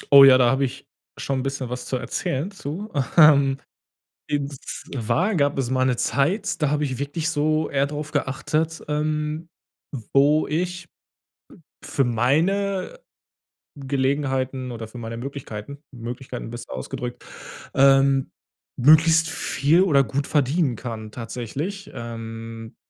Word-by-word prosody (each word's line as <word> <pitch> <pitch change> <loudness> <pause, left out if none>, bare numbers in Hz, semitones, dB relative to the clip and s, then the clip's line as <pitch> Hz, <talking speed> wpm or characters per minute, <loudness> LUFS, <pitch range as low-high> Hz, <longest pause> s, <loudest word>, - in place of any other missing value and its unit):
Oh, 140 - +12
ja, 130 -1 +9
da 120 -2 +4
habe 135 +1 +1
ich 125 - -7 0.3
schon 135 -1 -2
'n - - -3
bisschen 135 -2 -3
was 125 0 -5
zu 130 - -1
erzählen 135 +7 -3
zu. 195 +3 -6 0.3
Ähm, 140 -4 +7 0.7
und 145 -1 -1
zwar 160 - -2
gab 140 -1 +2
es 130 -2 -1
mal 130 0 +1
eine 130 -2 +2
Zeit, 185 - 0
da 150 - +2
habe 150 0 +1
ich 130 -3 -3
wirklich 150 +3 -2
so 155 0 +1
eher 140 0 +1
drauf 150 +1 -5
geachtet, 155 +3 -1
ähm, 150 +2 -2 0.6
wo 145 +3 +4
ich 175 +2 -2 1.0
für 135 - 0
meine, 185 - +1 0.8
Gelegenheiten 130 -1 -1
oder 115 -1 -6
für 120 - -11
meine 115 -1 -6
Möglichkeiten 135 0 -7 0.2
Möglichkeiten 125 +1 -6
besser 120 - -8
ausgedrückt, 120 - -6 0.5
ähm, 135 0 +4 0.5
möglichst 160 +4 +5
viel 155 +3 +2
oder 145 -7 +4
gut 135 +4 -2
verdienen 145 -1 +1
kann 110 -2 -7
tatsächlich. 130 - -5
Ähm, 115 -1 -7
140 Hz, 130 wpm, -23 LUFS, 125-155 Hz, 1.0 s, Oh